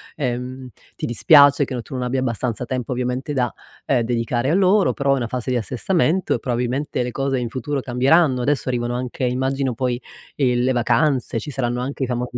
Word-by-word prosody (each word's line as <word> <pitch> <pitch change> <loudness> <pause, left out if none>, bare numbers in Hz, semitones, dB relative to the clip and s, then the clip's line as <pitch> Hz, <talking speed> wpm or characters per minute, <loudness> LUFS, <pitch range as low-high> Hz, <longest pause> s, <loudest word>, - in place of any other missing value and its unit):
ehm, 125 -1 -4 0.3
ti - - -4
dispiace 140 +4 +6
che 130 -2 -4
tu 135 - -12
non 125 - -2
abbia 125 +1 -1
abbastanza 120 -1 -1
tempo, 125 -1 -4
ovviamente 125 +3 -2
da, 125 -3 0 0.3
ehm, 130 -4 +2
dedicare 120 +3 -1
a - - +2
loro, 195 +2 +3
però, 140 -1 +1
è - - +3
una 120 - -2
fase 125 +1 -4
di 125 - +1
assestamento 165 - 0
e - - -3
probabilmente 125 +3 -2
le 125 - -4
cose 135 +1 -1
in 120 -2 -3
futuro 135 +3 -3
cambieranno. 130 +2 +3
Adesso 135 0 0
arrivano 120 -1 -1
anche 125 +1 -4
immagino 130 +1 -1
poi, 125 0 -1 0.4
ehm, 125 -3 +1
le 130 - +2
vacanze, 125 0 +1
ci 130 - -7
saranno 125 -2 -2
anche 135 +1 -3
i - - +2
famosi 125 0 -3
125 Hz, 200 wpm, -21 LUFS, 120-140 Hz, 0.4 s, dispiace